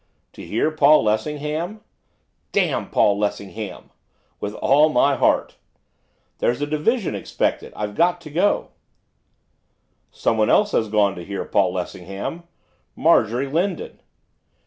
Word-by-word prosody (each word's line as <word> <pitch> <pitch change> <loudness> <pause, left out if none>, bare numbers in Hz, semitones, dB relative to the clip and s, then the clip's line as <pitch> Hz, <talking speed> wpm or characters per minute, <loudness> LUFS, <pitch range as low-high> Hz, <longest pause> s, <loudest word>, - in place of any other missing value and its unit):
'To - - -11
hear 115 +8 0
Paul 155 -2 +5
Lessingham?' 150 - -2 0.7
'Damn - - 0
Paul 100 0 +3
Lessingham!' 105 0 -4 0.5
'With 105 +1 -5
all 150 +3 +4
my 140 0 +3
heart!' - - +1 0.8
'There's 120 - +1
a 145 - 0
division 160 +9 0
expected, - - -2
I've 105 -1 -4
got 175 +7 +2
to 155 -3 -11
go.' 185 +7 +1 1.4
'Someone 110 -1 0
else 205 0 +3
has 110 - +1
gone 105 -2 +2
to 90 - -7
hear 100 +2 -5
Paul - - +2
Lessingham, 100 - -6 0.5
Marjorie 125 -5 +3
Lindon. 185 - -2
140 Hz, 120 wpm, -22 LUFS, 105-165 Hz, 1.4 s, Paul